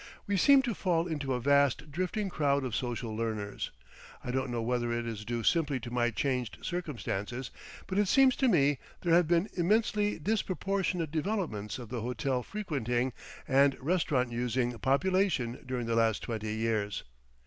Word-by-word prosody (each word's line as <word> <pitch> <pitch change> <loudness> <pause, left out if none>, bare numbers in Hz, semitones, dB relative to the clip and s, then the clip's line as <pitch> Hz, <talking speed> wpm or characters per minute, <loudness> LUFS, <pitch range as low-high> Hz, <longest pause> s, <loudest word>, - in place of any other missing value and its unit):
We 200 - 0
seemed 270 +8 +6
to 240 -3 -1
fall 175 -4 +1
into 145 -6 -2
a - - -1
vast 140 +3 +2
drifting 185 +6 -1
crowd 140 -5 +1
of 125 -4 -2
social 120 -2 -3
learners. 110 -2 -3 0.5
I 125 - -3
don't 130 0 -1
know 120 -1 -2
whether 120 0 0
it 120 0 -1
is 110 -3 -5
due 115 +1 -3
simply 150 -4 +2
to 120 0 -8
my 120 -1 +2
changed 125 0 -2
circumstances, 125 - -3 0.3
but 190 +1 -1
it 205 - +3
seems 270 +5 +5
to 265 - +3
me 145 - +3 0.2
there 170 -2 +2
have 175 -1 +5
been 170 +3 +3
immensely 210 +3 +1
disproportionate 190 -2 -1
developments 155 - -2
of 120 -4 -9
the 120 -2 -3
hotel 125 +2 -1
frequenting 130 - -2 0.3
and 135 0 +4
restaurant 140 -5 +1
using 120 +1 0
population 140 - +1
during 125 -2 -2
the 115 0 0
last 115 -2 +2
twenty 110 -2 -3
years. 110 -2 -1
135 Hz, 165 wpm, -30 LUFS, 120-175 Hz, 0.5 s, seemed